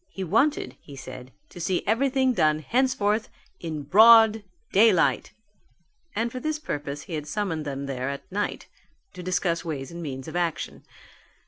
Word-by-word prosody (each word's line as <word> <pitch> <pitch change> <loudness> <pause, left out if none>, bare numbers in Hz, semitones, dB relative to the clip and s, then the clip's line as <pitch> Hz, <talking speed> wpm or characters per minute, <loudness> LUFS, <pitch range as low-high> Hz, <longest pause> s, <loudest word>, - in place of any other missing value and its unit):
He 195 - -6
wanted, 230 - +1
he 140 - -12
said, 130 -1 -10 0.2
to - - -12
see 180 +1 -1
everything 260 +3 +2
done 155 -8 +3
henceforth 225 - 0 0.3
in 155 -3 -5
broad 220 +5 +7 0.3
daylight: 195 -4 +3 0.8
and 230 +2 -1
for 255 - -5
this 310 +3 -2
purpose 145 - -5
he 175 - -9
had 150 -1 -4
summoned 165 -4 -2
them 140 -1 -4
there 130 -1 -3
at 140 0 -5
night 205 +2 -3 0.5
to 180 - -8
discuss 180 -1 -1
ways 145 -4 -5
and 170 0 -7
means 135 -4 -6
of 160 - -7
action. 175 -2 -2
175 Hz, 155 wpm, -25 LUFS, 150-225 Hz, 0.8 s, broad